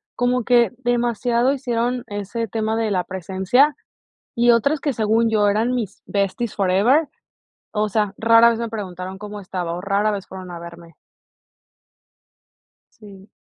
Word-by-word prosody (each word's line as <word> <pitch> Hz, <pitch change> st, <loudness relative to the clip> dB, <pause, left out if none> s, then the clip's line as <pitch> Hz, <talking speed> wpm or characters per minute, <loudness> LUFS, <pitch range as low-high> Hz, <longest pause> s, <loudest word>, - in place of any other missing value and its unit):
Como 250 Hz, 0 st, +1 dB
que 240 Hz, -4 st, +4 dB
demasiado 240 Hz, 0 st, +1 dB
hicieron 245 Hz, -2 st, -2 dB
ese 205 Hz, +3 st, -4 dB
tema 220 Hz, +1 st, -2 dB
de 225 Hz, -1 st, 0 dB
la 185 Hz, -2 st, +1 dB
presencia 190 Hz, -, +1 dB, 0.6 s
y 240 Hz, +1 st, +4 dB
otras 280 Hz, +6 st, +2 dB
que 285 Hz, -, -1 dB
según 225 Hz, +1 st, +2 dB
yo 210 Hz, -2 st, +2 dB
eran 220 Hz, +5 st, +1 dB
mis 220 Hz, -6 st, -4 dB
besties 200 Hz, +3 st, -2 dB
forever, 210 Hz, -, +3 dB, 0.6 s
o 210 Hz, 0 st, 0 dB
sea, 210 Hz, -1 st, 0 dB
rara 230 Hz, +1 st, +6 dB
vez 230 Hz, -1 st, -1 dB
me 235 Hz, -1 st, -3 dB
preguntaron 190 Hz, -3 st, -6 dB
cómo 210 Hz, +1 st, -8 dB
estaba 180 Hz, -3 st, -4 dB
o 175 Hz, -, -5 dB
rara 200 Hz, +2 st, +1 dB
vez 200 Hz, -2 st, -5 dB
fueron 185 Hz, -1 st, -9 dB
a 170 Hz, -, -7 dB
verme. 170 Hz, -1 st, -12 dB, 2.1 s
Sí. 200 Hz, -2 st, -14 dB
215 Hz, 145 wpm, -21 LUFS, 195-235 Hz, 2.1 s, rara